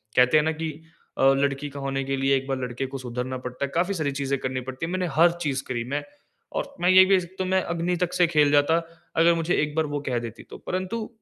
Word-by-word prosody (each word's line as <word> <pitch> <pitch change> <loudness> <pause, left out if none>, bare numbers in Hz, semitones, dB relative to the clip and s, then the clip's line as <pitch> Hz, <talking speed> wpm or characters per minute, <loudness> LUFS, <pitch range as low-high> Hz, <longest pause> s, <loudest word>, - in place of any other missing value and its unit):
कहते 125 +4 +5
हैं 150 - +4
ना 160 - +1
कि 160 0 -3 0.5
अ, - - +1
लड़की 140 +1 -1
का 140 0 -8
होने 135 0 -2
के 135 0 -1
लिए 135 +1 +3
एक 135 0 -1
बार 135 -1 -1
लड़के 125 +1 -3
को 135 - -6
सुधरना 125 0 -4
पड़ता 125 +2 -4
है। - - -7
काफ़ी 180 +4 +1
सारी 155 -6 -1
चीज़ें 140 0 -1
करनी 130 0 -3
पड़ती 130 +4 -4
है। 165 - -5
मैंने 185 -1 -1
हर 170 +2 +6
चीज़ 140 -4 -1
करी 120 -2 -2
मैं। 145 - -1 0.5
और - - -4
मैं 180 - +3
ये 185 0 +9
भी, 195 0 +4
तो 185 +2 -5
मैं 190 0 +2
अग्नि 170 +1 -1
तक 180 - -2
से 175 - +4
खेल 150 -3 +3
जाता 145 +3 +4 0.4
अगर 165 +1 +6
मुझे 165 +1 0
एक 150 0 -4
बार 160 0 +2
वो 145 -1 -3
कह 125 -4 -1
देती, 115 -1 -8
तो - - -11
परंतु 185 +5 -3
145 Hz, 255 wpm, -25 LUFS, 135-170 Hz, 0.5 s, ये